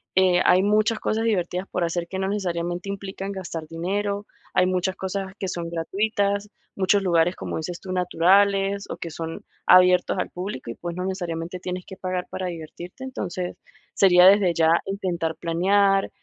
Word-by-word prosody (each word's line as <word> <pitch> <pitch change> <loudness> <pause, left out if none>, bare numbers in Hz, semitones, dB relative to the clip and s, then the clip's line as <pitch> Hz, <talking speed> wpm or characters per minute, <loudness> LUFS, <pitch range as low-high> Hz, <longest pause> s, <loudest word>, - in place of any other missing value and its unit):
eh, 185 -1 +4
hay 185 +1 +5
muchas 215 +2 +2
cosas 220 +1 -1
divertidas 185 -3 -1
por 180 - -1
hacer 170 0 -2
que 190 - -5
no 190 - -1
necesariamente 180 -2 -2
implican 195 0 -5
gastar 170 -5 -6
dinero, 200 +5 -2 0.3
hay 180 - +5
muchas 185 0 0
cosas 190 0 -4
que 190 - -2
son 170 -2 -4
gratuitas, 200 +4 -1 0.3
muchos 195 +1 +3
lugares, 175 0 +2
como - - -5
dices 170 +2 -5
tú, 185 - -8
naturales, 195 +3 +3
o, - - -5
que 170 - -6
son 165 +1 -6 0.2
abiertos 180 0 +6
al - - -2
público. 180 - -5
Y, - - -8
pues, 175 0 -6
no 180 - -3
necesariamente 175 -2 -4
tienes 180 0 -5
que 190 - -9
pagar 185 -1 -3
para 185 - -3
divertirte. 175 +7 -8
Entonces, 185 -8 -4 0.4
sería 180 -2 +6
desde 195 -2 +6
ya 160 0 +4 0.2
intentar 175 -5 -2
planear, 195 +4 +2
185 Hz, 170 wpm, -24 LUFS, 175-195 Hz, 0.4 s, abiertos